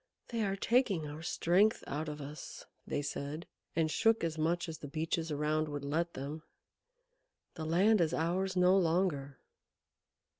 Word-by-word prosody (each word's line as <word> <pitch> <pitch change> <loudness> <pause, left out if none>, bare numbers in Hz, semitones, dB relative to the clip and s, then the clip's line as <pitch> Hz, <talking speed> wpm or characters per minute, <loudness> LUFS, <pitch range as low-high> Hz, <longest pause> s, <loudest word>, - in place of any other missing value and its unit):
"They 230 -2 -1
are 195 -1 0
taking 205 - +2
our 150 +2 -7
strength 185 +6 +2
out 150 +3 -3
of 150 0 -6
us," 145 +2 -8 0.2
they 145 - -1
said, 145 +3 -4 0.3
and 160 -2 +2
shook 225 +3 +3
as 165 -1 0
much 170 +3 0
as 160 -1 -6
the 145 - -7
Beeches 160 +2 -2
around 155 +1 0
would 145 -1 -4
let 165 +4 -1
them. 145 +4 -5 1.1
"The 160 - -5
land 190 +6 +4
is 165 -2 +2
ours 185 +4 0
no 180 +1 +5
longer." 165 -7 +1
160 Hz, 155 wpm, -33 LUFS, 150-185 Hz, 1.1 s, no